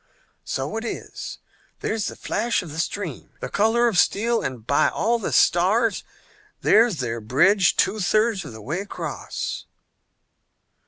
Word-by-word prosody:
"So 135 +11 -3
it 225 - -4
is, 235 - -6 0.4
there's 220 -2 -1
the - - -5
flash 235 -4 -1
of 165 - -9
the 160 - -6
stream, 175 -3 -4
the - - -5
color 225 +3 +3
of 205 -6 +2
steel, 230 +3 +2
and 120 -4 -5
by 140 +3 +3
all 235 +3 0
the 205 - -3
stars, 200 +5 +3 0.6
there's 215 - +4
their 115 -2 -3
bridge 180 - +3
two 215 - +1
thirds 215 +1 +2
of - - -9
the 110 -1 -11
way 155 - -2
across!" 200 +1 -5
200 Hz, 150 wpm, -23 LUFS, 150-225 Hz, 0.6 s, there's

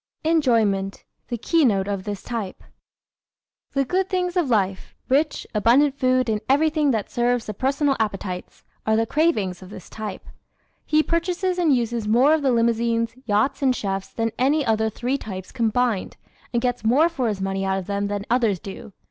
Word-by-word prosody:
Enjoyment 225 -12 +1 0.2
the 240 - -3
Keynote 225 - +2
of 200 -2 -3
This 205 -2 -5
Type 225 -6 -5
¶ - - -21 1.1
The 275 -1 +1
good 375 +5 0
things 360 -2 -1
of 345 -7 +1
life 195 -4 0
rich, 290 +4 +1
abundant 245 +7 +4
food 255 -1 +2
and 215 -2 0
everything 300 +1 +3
that 220 -6 -1
serves 245 0 +1
the 215 - -5
personal 275 +5 +1
appetites 195 -4 -4 0.2
are 220 - +2
the 225 +1 +2
cravings 220 - 0
of 185 - -11
this 190 - -11
type. 215 -3 -6 0.6
He 310 0 +3
purchases 355 +2 -1
and 315 -6 +4
uses 235 -2 -2
more 250 +8 +5
of 315 - +2
the 275 - +2
limousines, 230 0 +1
yachts 225 +7 +1
and 260 -2 +3
chefs 195 -3 -3
than 225 0 -2
any 285 +3 +2
other 220 0 +1
three 250 +5 -2
types 190 -5 -7
combined, 235 -3 0 0.3
and 235 0 0
gets 245 -2 -1
more 260 +9 +4
for 280 -8 -2
his 210 -3 -2
money 195 0 -2
out 190 0 0
of 190 - -4
them 200 +1 -2
than 205 0 -3
others 230 -6 +2
do. 195 +2 -10
235 Hz, 180 wpm, -23 LUFS, 205-275 Hz, 1.1 s, more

